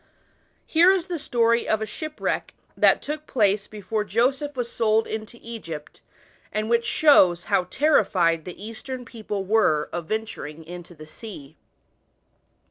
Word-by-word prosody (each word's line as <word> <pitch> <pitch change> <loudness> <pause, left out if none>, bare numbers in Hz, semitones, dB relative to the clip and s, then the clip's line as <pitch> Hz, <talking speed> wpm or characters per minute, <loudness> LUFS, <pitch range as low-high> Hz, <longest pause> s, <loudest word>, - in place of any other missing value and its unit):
Here 340 +3 +5
is 375 -3 +1
the 355 -3 -4
story 235 -2 +2
of 220 - +2
a 220 - -2
shipwreck, 310 +6 -4 0.2
that - - +4
took 305 +1 -5
place 205 -3 +2
before 210 +1 -3
Joseph 260 +8 0
was 240 -1 -2
sold 220 -1 +2
into 220 +2 -6
Egypt, 170 -10 -8 0.5
and 215 +2 -2
which 235 0 +3
shows 190 - +5
how 195 -3 +1
terrified 180 - +2
the 180 - -8
Eastern 245 +4 -7
people 215 -4 -5
were 185 -8 +2
of 170 -2 -4
venturing 165 -8 -5
"on 175 +1 -7
the 165 -3 -13
sea. 155 -4 -10
220 Hz, 140 wpm, -24 LUFS, 180-245 Hz, 0.5 s, Here